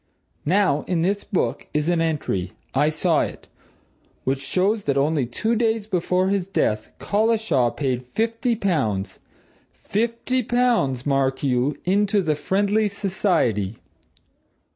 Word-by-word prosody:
Now, 175 Hz, -5 st, +3 dB
in 170 Hz, -3 st, +1 dB
this 200 Hz, +3 st, 0 dB
book 200 Hz, -4 st, -2 dB
is 150 Hz, +1 st, +1 dB
an 175 Hz, -1 st, +2 dB
entry 145 Hz, -, -1 dB, 0.2 s
I 150 Hz, -, +3 dB
saw 155 Hz, +1 st, +2 dB
it -, -, -5 dB, 0.8 s
which 135 Hz, +1 st, -1 dB
shows 200 Hz, +7 st, 0 dB
that 140 Hz, -1 st, +1 dB
only 140 Hz, -2 st, +1 dB
two 220 Hz, -, -1 dB
days 225 Hz, -2 st, +1 dB
before 185 Hz, -1 st, +1 dB
his 195 Hz, -2 st, 0 dB
death, 110 Hz, -, 0 dB
Collishaw 210 Hz, -, +1 dB
paid 130 Hz, -2 st, -2 dB
fifty 230 Hz, -, 0 dB
pounds 135 Hz, -, -1 dB, 0.6 s
fifty 235 Hz, +4 st, -1 dB
pounds, 230 Hz, -, +1 dB
mark 135 Hz, -1 st, +1 dB
you! 130 Hz, +1 st, +1 dB
into 200 Hz, +2 st, +2 dB
the 155 Hz, -2 st, +1 dB
Friendly 200 Hz, +7 st, +1 dB
Society. 180 Hz, -, 0 dB
180 Hz, 125 wpm, -23 LUFS, 140-210 Hz, 0.8 s, Now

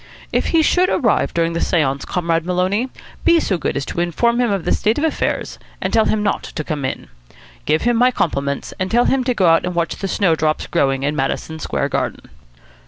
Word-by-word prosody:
If -, -, +1 dB
he 325 Hz, -1 st, +3 dB
should 365 Hz, +4 st, +3 dB
arrive 230 Hz, -5 st, +1 dB
during 165 Hz, 0 st, 0 dB
the 170 Hz, -, -2 dB
seance, 140 Hz, -5 st, 0 dB
Comrade 165 Hz, -2 st, 0 dB
Maloney, 185 Hz, +7 st, 0 dB, 0.3 s
be 335 Hz, -, +5 dB
so 190 Hz, -, -1 dB
good -, -, -2 dB
as 140 Hz, -, -2 dB
to -, -, -5 dB
inform 235 Hz, +8 st, +1 dB
him 240 Hz, -, +2 dB
of 195 Hz, -4 st, -2 dB
the -, -, +1 dB
state 215 Hz, +2 st, +1 dB
of 295 Hz, -, -1 dB
affairs, 320 Hz, -, -1 dB, 0.2 s
and -, -, -3 dB
tell 220 Hz, -, +4 dB
him 210 Hz, -1 st, 0 dB
not 205 Hz, -, 0 dB
to 155 Hz, -, -6 dB
come 150 Hz, -2 st, -4 dB
in. -, -, -4 dB, 0.6 s
Give 155 Hz, +1 st, +1 dB
him 240 Hz, -1 st, +2 dB
my 250 Hz, +2 st, +5 dB
compliments, 140 Hz, -, -2 dB
and 185 Hz, 0 st, -1 dB
tell 240 Hz, +3 st, +3 dB
him 265 Hz, -1 st, +2 dB
to 250 Hz, -1 st, 0 dB
go 190 Hz, -, +2 dB
out 165 Hz, -1 st, +4 dB
and 180 Hz, -1 st, -3 dB
watch 170 Hz, -1 st, -1 dB
the 195 Hz, -, -3 dB
snowdrops 160 Hz, -6 st, +1 dB
growing 135 Hz, -5 st, 0 dB
in 145 Hz, +2 st, 0 dB
Madison 155 Hz, +3 st, -2 dB
Square -, -, -2 dB
Garden." -, -, -3 dB
180 Hz, 220 wpm, -19 LUFS, 160-235 Hz, 0.6 s, be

